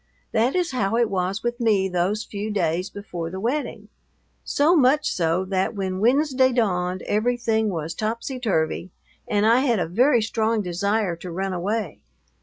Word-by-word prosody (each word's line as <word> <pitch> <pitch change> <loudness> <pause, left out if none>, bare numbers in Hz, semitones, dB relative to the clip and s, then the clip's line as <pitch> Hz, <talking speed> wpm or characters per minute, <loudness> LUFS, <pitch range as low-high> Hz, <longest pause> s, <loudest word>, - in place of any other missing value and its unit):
That 235 +7 +1
is 355 -4 0
how 225 -3 0
it 235 -3 +2
was 190 +2 -1
with 240 +1 -2
me 210 -5 +2
those 190 +4 -1
few 210 -1 -5
days 180 -2 -1
before 175 -5 -6
the 190 +2 -6
wedding; 255 +8 -3 0.5
so 305 +5 +3
much 295 0 +3
so 170 +2 0
that 190 +3 -1
when 190 -2 -3
Wednesday 260 +3 +3
dawned 185 -6 0
everything 220 0 0
was 165 -3 -3
topsy 230 +4 -3
turvy 180 -6 -1 0.4
and 205 0 +1
I 230 +3 +5
had 250 -4 +2
a 175 - 0
very 235 - +3
strong 220 0 0
desire 195 +1 0
to 180 - -8
run 190 +2 -3
away. 195 0 -3
210 Hz, 165 wpm, -23 LUFS, 185-240 Hz, 0.5 s, I